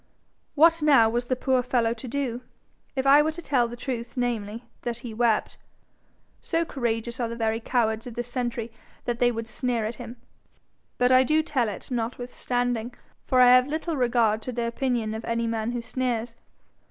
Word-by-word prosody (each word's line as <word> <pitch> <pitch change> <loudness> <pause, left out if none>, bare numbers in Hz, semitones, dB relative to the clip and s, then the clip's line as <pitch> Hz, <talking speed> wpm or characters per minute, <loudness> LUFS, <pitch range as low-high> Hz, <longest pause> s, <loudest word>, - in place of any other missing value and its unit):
What 330 +2 +5
now 275 -7 +6
was 240 +1 -1
the 255 - 0
poor 260 0 +1
fellow 240 -2 +1
to 240 +2 -9
do? 250 -2 -2 0.5
If 265 0 -1
I 280 +2 +7
were 310 +1 0
to 345 - -8
tell 250 -6 +2
the 235 - -7
truth 240 0 -5
namely, 230 -2 -2 0.2
that 235 -1 -3
he 230 - -5
wept 225 -1 +1 0.8
so 335 0 0
courageous 235 -3 -3
are 235 -2 -1
the 230 - -5
very 225 -1 0
cowards 225 -1 0
of 235 - -8
this 240 0 -3
century 240 -2 -3 0.3
that 240 -1 -2
they 245 0 +4
would 230 -1 -5
sneer 235 0 -1
at 225 +2 -4
him; 235 0 -8 0.8
but 250 0 +3
I 255 0 +7
do 310 +4 +2
tell 255 -7 0
it 205 - -8
notwithstanding, 245 0 -2 0.3
for 255 -1 +4
I 250 0 +8
have 255 +1 +6
little 315 +2 -2
regard 235 -4 +2
to 255 - -5
the 235 -1 -2
opinion 235 -2 -1
of 220 +1 -5
any 230 0 -1
man 225 -1 -1
who 240 -1 -4
sneers. 235 -2 -2
240 Hz, 190 wpm, -26 LUFS, 230-255 Hz, 0.8 s, I